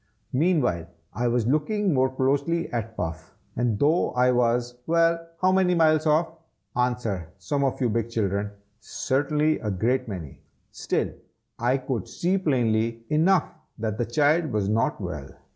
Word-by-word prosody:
Meanwhile 130 - +1 0.3
I 120 0 -1
was 120 -1 +1
looking 165 - +1
more 130 -1 +3
closely 140 +6 0
at 110 -1 -3
Puff, 80 -2 -5 0.2
and 120 -3 0
though 155 - +2
I 125 0 +3
was 120 0 +1
well, 165 0 +2 0.2
how 185 - +5
many 185 -1 +3
miles 155 -1 +3
off? 155 +2 +3 0.5
answer, 120 -8 -1
some 120 +10 -1
of 135 - 0
you 125 - +2
big 115 0 -1
children! 100 -3 -1 0.3
certainly 150 +7 0
a 105 - -3
great 120 +7 0
many! 90 -9 -7 0.3
still - - -1 0.5
I 125 +3 +2
could 130 -5 -3
see 185 +3 0
plainly 115 -7 0
enough 165 +3 +4 0.3
that 110 -2 -3
the 120 - +1
child 150 +7 +3
was 105 -3 0
not 110 +2 +1
well. 75 -8 -6
125 Hz, 150 wpm, -25 LUFS, 110-155 Hz, 0.5 s, how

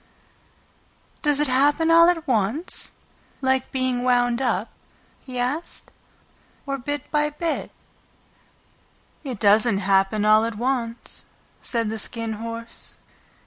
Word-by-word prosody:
"Does 295 -2 +2
it 295 - +2
happen 290 +5 +3
all 335 +1 +7
at 330 -3 0
once, 235 - 0 0.5
like 265 -1 0
being 255 -2 0
wound 245 0 +2
up," 225 -4 0 0.5
he 255 -2 -8
asked, 260 +7 -3 0.7
"or 275 -1 -3
bit 290 +2 -4
by 300 0 +2
bit?" 315 +2 -3 1.5
"It 260 -6 -4
doesn't 210 +1 +4
happen 195 +2 +2
all 215 +1 +6
at 230 -1 -3
once," 240 0 -3 0.4
said 230 -3 0
the 220 - -2
Skin 230 +1 -2
Horse. 230 0 -6
245 Hz, 115 wpm, -23 LUFS, 225-285 Hz, 1.5 s, all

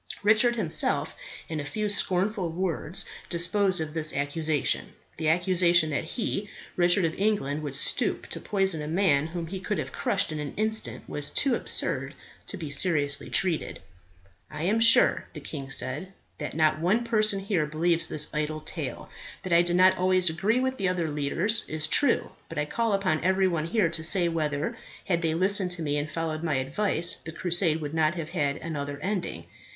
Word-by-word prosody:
Richard 220 +3 +4
himself 185 -9 0 0.3
in 160 -1 -4
a - - -3
few 210 +9 -3
scornful 195 -1 +1
words 175 -1 -2 0.2
disposed 185 +2 +1
of 155 -1 -4
this 155 -1 -1
accusation. 145 +1 -1 0.2
The 160 -1 0
accusation 175 -1 +3
that 140 - -1
he, 205 +1 -3 0.3
Richard 175 +1 +3
of 160 - -1
England, 195 -9 0
would 145 -3 -4
stoop 140 - +1
to - - -6
poison 190 -6 -1
a 150 - -5
man 155 -4 +2
whom 170 0 -5
he 190 +3 -6
could 205 +2 -3
have - - -4
crushed - - 0
in 155 - -4
an 150 -1 -6
instant, 220 +1 -2
was 145 -1 -3
too 275 -3 +2
absurd - - -1 0.3
to 200 - -4
be 155 -5 -6
seriously 145 -2 +1
treated. 175 -5 -1 0.7
"I 150 - -6
am 210 +6 +1
sure," 230 0 +6
the - - -7
king 140 -3 -7
said, 185 +7 -1 0.3
"that 150 - -5
not 155 -1 +2
one 195 +8 +1
person 215 -3 +3
here 195 -6 -1
believes 165 +2 +1
this 150 0 -1
idle 155 0 -2
tale. - - -6 0.4
That 185 -2 -2
I 170 - +6
did 175 0 +1
not 185 +1 +4
always 185 -2 +3
agree 205 +9 0
with 260 0 -1
the 190 -2 +1
other 170 -4 -2
leaders 150 +10 +1
is 155 -1 0
true; 270 - +3 0.2
but 165 - -8
I 150 - 0
call 230 +7 -1
upon 185 -6 0
every 190 +1 +2
one 165 -3 -2
here 180 -2 +1
to 160 -1 -3
say 175 +1 +4
whether, 155 +4 -2 0.3
had 170 -3 0
they 160 -2 0
listened 190 +1 +4
to 170 -2 -5
me 145 -1 -1
and 145 +1 -4
followed 160 -1 -3
my 160 -4 -1
advice, 165 +6 0
the 160 - -7
crusade 170 -2 +1
would 145 0 -5
not 160 +1 +1
have 165 -2 -6
had 145 -5 -1
another 145 -3 -5
ending. 195 -2 -3
170 Hz, 190 wpm, -26 LUFS, 155-195 Hz, 0.7 s, sure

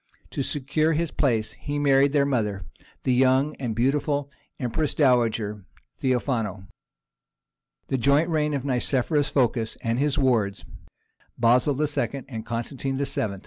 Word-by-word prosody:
To - - -2
secure 150 +4 0
his 165 +1 -1
place 115 -7 0
he 145 0 -5
married 140 -1 +4
their 140 -1 +3
mother, 105 -8 -1 0.4
the 130 - +2
young 130 +3 +3
and 120 -5 -3
beautiful 140 +3 0 0.3
empress 130 +4 -1
dowager 115 -7 +2 0.4
Theophano. 120 -6 -1 1.3
The 135 - 0
joint 140 +6 +3
reign 150 -3 0
of 140 -1 -3
Nicephorus 135 +3 +1
Phocas 120 -4 0
and 115 +1 0
his 145 0 +1
wards, 115 -7 +1 0.7
Basil 125 +4 +3
II. 140 -3 -1
and 115 -5 -6
Constantine 130 +4 -3
VIII. 130 -7 -1
130 Hz, 130 wpm, -25 LUFS, 115-145 Hz, 1.3 s, married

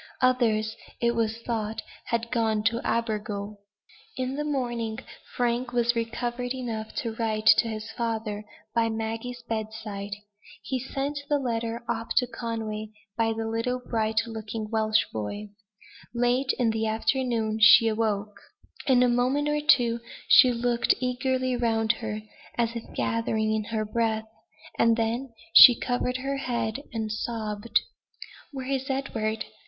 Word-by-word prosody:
Others, 225 -4 +2 0.2
it 235 0 +2
was 225 -1 0
thought, 220 -2 -2 0.2
had 235 0 -2
gone 220 -3 +1
to 230 +1 +1
Abergele. 210 -2 -2 0.6
In 255 0 -2
the 295 - -2
morning 240 -6 -2 0.4
Frank 245 +1 0
was 240 0 +2
recovered 240 +2 -2
enough 225 -4 -4
to 230 -6 -2
write 220 -1 -2
to 235 - +2
his 215 -1 -5
father, 220 -3 -3 0.3
by 230 -1 +2
Maggie's 225 +2 -4
bedside. 215 -2 -4 0.5
He 260 - -2
sent 275 +3 -3
the 295 - +3
letter 235 -3 -2
off 230 -1 -2
to 250 - +4
Conway 225 -3 -4 0.3
by 230 - +2
a 225 0 -1
little 230 +3 -1
bright 220 -3 0
looking 220 -1 -5
Welsh 220 -1 +2
boy. 205 - -4 0.7
Late 245 +3 +2
in 235 -3 +2
the 220 0 -1
afternoon 225 -1 0
she 225 +1 +8
awoke. 215 -2 -1 0.5
In 250 -2 +5
a - - +5
moment 255 +5 +1
or 295 0 +1
two 245 -7 +4 0.3
she 255 - +8
looked 240 0 +2
eagerly 255 0 0
round 225 -2 +2
her, 215 -1 -4 0.3
as 230 -1 0
if 230 - -7
gathering 220 -1 0
in 215 -1 -1
her 220 0 -2
breath; 220 0 0 0.5
and 230 0 +4
then 235 +3 -1 0.2
she 245 -3 +11
covered 250 0 -1
her 275 +1 -2
head 235 -2 -2
and 220 -2 -3
sobbed. 215 0 -1 0.7
"Where 265 -2 -6
is 270 0 -2
Edward?" 225 -5 -2
230 Hz, 140 wpm, -27 LUFS, 220-245 Hz, 0.7 s, she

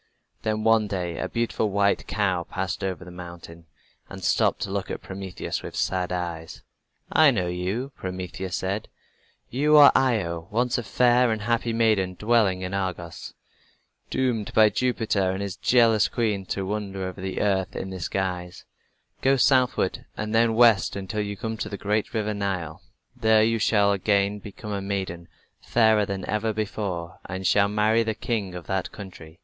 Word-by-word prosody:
Then 110 0 -1
one 110 -1 +4
day 90 -4 -3
a 95 - -2
beautiful 115 -2 -1
white 100 0 +1
cow 95 -4 0
passed 95 0 -4
over 95 -1 -3
the 90 - -10
mountain, 85 -1 -10 0.4
and - - -9
stopped - - +2
to - - -3
look - - -3
at - - -5
Prometheus 95 -1 -5
with - - -8
sad 90 -1 -1
eyes. 85 -2 -5 0.5
"I 155 -1 +6
know 100 -9 0
you," 95 +10 -3
Prometheus 95 0 -5
said. 100 +3 -2 0.6
"You 150 +4 +4
are 145 -1 +10
Io, 85 -10 +1
once 120 +3 0
a - - -4
fair 125 +3 +3
and 110 -1 -2
happy 115 +1 0
maiden 110 -5 +2
dwelling 105 -3 +2
in 90 +1 -4
Argos, 90 -4 -4 0.7
doomed 120 -5 -1
by 110 -1 +7
Jupiter 110 -6 0
and 95 +1 -2
his 100 -2 -4
jealous 115 -1 +4
queen 105 -5 -1
to 95 - -2
wander 100 -1 -3
over 95 0 -6
the 95 0 -3
earth 95 -2 0
in 95 - -4
this 95 -2 -4
guise. 90 -2 -3 0.6
Go 135 +1 +4
southward 130 -1 +2
and 105 +1 -3
then 115 0 +3
west 115 -6 +5
until 100 +2 -3
you 100 -1 -4
come 110 +3 -4
to - - -4
the 100 - -5
great 105 +2 -1
river 105 -1 -1
Nile. 95 -6 -3 0.3
There 110 -1 +4
you 115 +1 +1
shall 105 -2 +3
again 100 +1 +1
become 105 +1 -9
a 100 -1 -2
maiden, 95 -4 -4 0.3
fairer 110 -3 +3
than 95 -2 -4
ever 110 +1 0
before, 100 -6 -4
and 95 +1 -5
shall 100 +2 +4
marry 105 +2 +2
the 110 -1 -1
king 100 -7 -3
of 90 - -7
that 95 -1 -2
country. 85 -5 -11
100 Hz, 170 wpm, -25 LUFS, 95-110 Hz, 0.7 s, are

